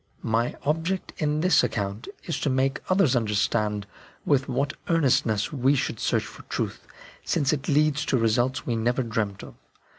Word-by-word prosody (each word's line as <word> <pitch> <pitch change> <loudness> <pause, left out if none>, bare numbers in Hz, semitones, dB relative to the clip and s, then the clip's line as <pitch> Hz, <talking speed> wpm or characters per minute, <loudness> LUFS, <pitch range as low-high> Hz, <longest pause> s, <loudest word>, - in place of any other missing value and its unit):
My 115 +2 0
object 165 +5 -1
in 150 0 0
this 180 -2 +4
account 100 +2 -3 0.2
is 165 - -3
to 145 - 0
make 135 +1 +1
others 185 -8 +3
understand 105 -2 0 0.4
with 140 -2 +2
what 140 +2 0 0.2
earnestness 130 -10 +2
we 135 +1 +3
should 130 -5 -2
search - - 0
for - - -11
truth, - - -3 0.4
since 140 0 +1
it 145 -1 -3
leads 150 0 +2
to 130 - +1
results 120 +2 +1
we 120 - -1
never 120 +3 +1
dreamt 110 -4 -2
of. - - -10
130 Hz, 160 wpm, -26 LUFS, 115-150 Hz, 0.4 s, this